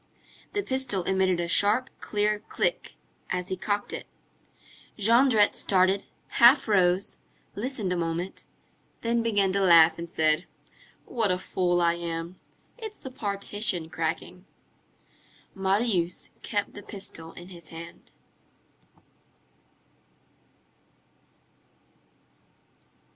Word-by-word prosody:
The 410 - -1
pistol 260 - 0
emitted 190 -1 +1
a 170 - -1
sharp, 210 +8 +2
clear 210 0 0
click, - - -2 0.3
as 180 +1 -3
he 190 - -1
cocked 205 +2 -2
it. - - -6 0.9
Jondrette 230 0 +4
started, 190 +1 +2 0.3
half 240 +3 +7
rose, 185 -2 +2 0.3
listened 215 -4 -2
a - - -1
moment, 170 +2 -3 0.6
then 235 0 +1
began 205 -4 +2
to 200 +1 +1
laugh 170 -3 +6
and 170 0 -6
said:— 155 +2 +1 0.6
"What 230 -5 -1
a 180 - +2
fool 180 -1 0
I 170 0 +3
am! 170 +1 -5 0.4
It's 435 -2 -7
the 265 - -9
partition 200 -6 -1
cracking!" 165 +3 -4 1.1
Marius 190 -2 0
kept 205 -1 -2
the 205 - -10
pistol 190 -6 -7
in 175 +1 -11
his 170 -3 -7
hand. 165 +2 -11
190 Hz, 105 wpm, -27 LUFS, 175-210 Hz, 1.1 s, half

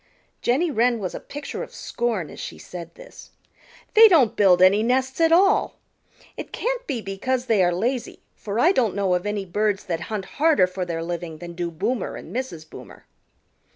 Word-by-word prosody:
Jenny 295 +8 +1
Wren 240 -1 +2
was 190 -5 -4
a - - -5
picture 290 0 -7
of - - -8
scorn 225 -10 -3
as - - -11
she - - -7
said 175 -2 -10
this. - - -14 0.6
"They 445 +1 +9
don't 305 - +4
built 185 -3 +5
any 190 +3 +5
nests 260 +5 0
at 325 0 +4
all. 390 +4 +3 0.6
It - - -8
can't - - -3
be 240 -4 -2
because 245 +6 -2
they 220 -6 +3
are 175 - +3
lazy 235 +8 -2 0.2
for 210 +2 -5
I 335 +8 +5
don't 235 - +1
know 195 -2 +1
of 180 +3 -1
any 205 -1 -2
birds 205 +2 -1
that 170 -3 -3
hunt 210 -3 -3 0.2
harder 310 - +5
for 185 0 -4
their 165 -1 -4
living 170 -1 -5
than 170 +2 -9
do 175 0 -3
Boomer 220 +10 -3
and - - -10
Mrs. 175 -12 -5
Boomer." - - -13
215 Hz, 190 wpm, -23 LUFS, 180-260 Hz, 0.6 s, They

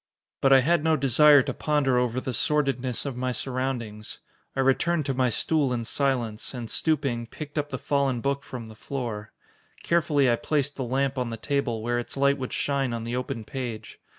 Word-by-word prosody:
But 135 - +4
I 135 -1 +8
had 165 +3 +2
no 160 0 +3
desire 140 +1 +6
to - - -3
ponder 140 -4 +1
over 125 0 0
the 130 0 -4
sordidness 135 -2 0
of 135 -3 -3
my 130 +1 -1
surroundings. 120 -3 -4 0.4
I 135 - +1
returned 150 +4 +2
to 135 - 0
my 130 -1 +2
stool 145 +3 +1
in 120 -2 -2
silence, 125 -4 -1
and 120 -2 -5
stooping, 135 -7 0
picked 145 +5 -9
up 145 -1 -1
the 130 - -3
fallen 140 -3 0
book 140 +3 -1
from 125 -4 -8
the 110 - -11
floor. 110 -3 -5 0.5
Carefully 155 -5 +2
I 120 -1 +3
placed 145 0 0
the 135 - -3
lamp 135 +2 0
on 125 -2 -1
the 115 - -5
table, 120 -3 -1
where 120 +1 0
its 120 - -6
light 140 0 +3
would 130 - -4
shine 135 -3 0
on 115 -1 -3
the 120 +1 -3
open 125 -3 -3
page. 115 -5 -6
130 Hz, 200 wpm, -26 LUFS, 120-140 Hz, 0.5 s, I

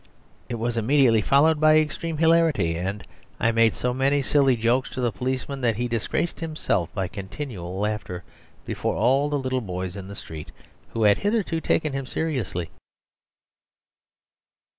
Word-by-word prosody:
It 120 - -2
was 115 +1 -1
immediately 120 -2 +4
followed 150 +7 +4
by 155 0 +6
extreme 155 +1 -1
hilarity, 160 - +3
and 95 +4 -3 0.4
I 115 - +3
made 115 0 +3
so 125 0 -1
many 135 +2 +1
silly 135 -1 +3
jokes 120 +3 +1
to - - -4
the 120 -2 +1
policeman 130 +6 -3
that 115 -3 +2
he 120 +3 -1
disgraced 120 +8 -2
himself 155 - -1
by 95 -3 -1
continual 95 -2 -6
laughter 105 -4 -3 0.4
before - - -2
all 135 +3 +2
the 145 - 0
little 130 -1 -1
boys 90 -3 -5
in 95 -2 -7
the 100 - -8
street, 80 -5 -9 0.4
who 115 - 0
had 105 -1 +5
hitherto 205 -6 0
taken 155 -3 0
him 135 -1 -3
seriously. 125 - -3
125 Hz, 155 wpm, -24 LUFS, 105-145 Hz, 0.4 s, by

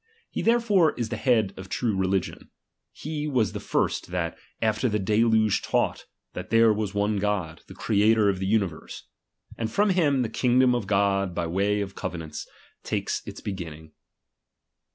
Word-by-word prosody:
He - - -3
therefore 220 -8 +3
is 115 -2 -3
the - - -3
head 110 -7 +2
of 95 0 -9
true 115 -1 -1
religion; 95 0 -1 0.4
he 150 0 -5
was 125 -8 +1
the - - -4
first - - -1
that 90 -2 -3 0.2
after 110 +3 +1
Ihe 105 -4 -1
deluge 110 0 +3
taught, - - -1 0.3
that - - -7
there 115 -1 +5
was 105 -1 -3
one 105 +1 +1
God, 95 -6 -2
the - - -11
Creator 110 +1 +3
of 95 -2 +1
the 95 - -2
universe. 100 -6 -2 0.6
And 115 -1 -1
from 205 - +2
him 145 -8 +2
the - - -1
king 120 +3 +1
dom 130 -1 +5
of 120 -5 -2
God 100 -2 +1
by 85 - -1
way 100 +5 0
of 95 -1 -5
covenants, 80 -5 -6 0.3
takes - - -2
its - - -8
begin 90 -6 -5
ning. 80 0 -15
105 Hz, 175 wpm, -26 LUFS, 95-120 Hz, 0.6 s, there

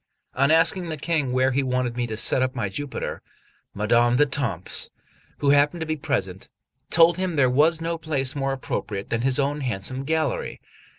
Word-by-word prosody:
On 140 +1 +2
asking 165 +2 +3
the 155 - -4
King 150 -3 -1
where 130 +1 +2
he 135 +2 +1
wanted 125 -2 -1
me 120 -1 -1
to 110 -1 -5
set 125 - +1
up 130 +1 0
my 105 -5 -2
Jupiter, 145 +8 -5 0.5
Madame 120 +3 +3
d'Etampes, 135 - -1 0.5
who 140 - +2
happened 145 +4 +3
to - - -1
be 155 0 -1
present, 100 -11 -3 0.4
told 170 0 +5
him 185 -2 -2
there 130 -4 +3
was 160 +5 +3
no 165 0 -2
place 145 -4 -1
more 135 -1 -1
appropriate 105 -6 -4
than 115 - 0
his 130 +1 +1
own 145 +1 0
handsome 130 +1 -2
gallery. 160 +2 -1
135 Hz, 180 wpm, -24 LUFS, 125-155 Hz, 0.5 s, told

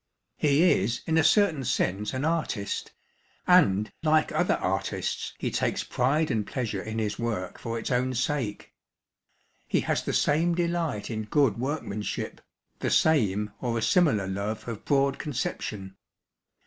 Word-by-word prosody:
He 145 +2 +3 0.2
is 110 +5 -1
in 160 - 0
a - - +4
certain 170 -7 +3
sense 105 -3 0
an 130 +2 -2
artist, 155 -11 -2 0.5
and, 110 - +4
like 155 -1 +3
other - - +2
artists, - - -2
he - - -2
takes - - 0
pride 145 +6 +1
and 110 -2 -1
pleasure 110 -7 -3
in 110 +2 -5
his 105 -2 -2
work 110 -6 -3
for 115 -1 -4
its 115 - -4
own 130 +1 +1
sake. 125 -5 -2 0.9
He - - +1
has - - 0
the - - -3
same 165 +4 +2
delight 170 -10 -1
in 110 -1 -3
good 125 -3 +2
workmanship, 125 -6 -3 0.4
the - - -1
same 105 -9 +2
or 120 -2 -1
a 115 - -1
similar 145 - +3
love 100 +4 -4
of 115 -3 -6
broad 140 -1 +2
conception. 105 -8 -4
125 Hz, 150 wpm, -27 LUFS, 105-155 Hz, 0.9 s, a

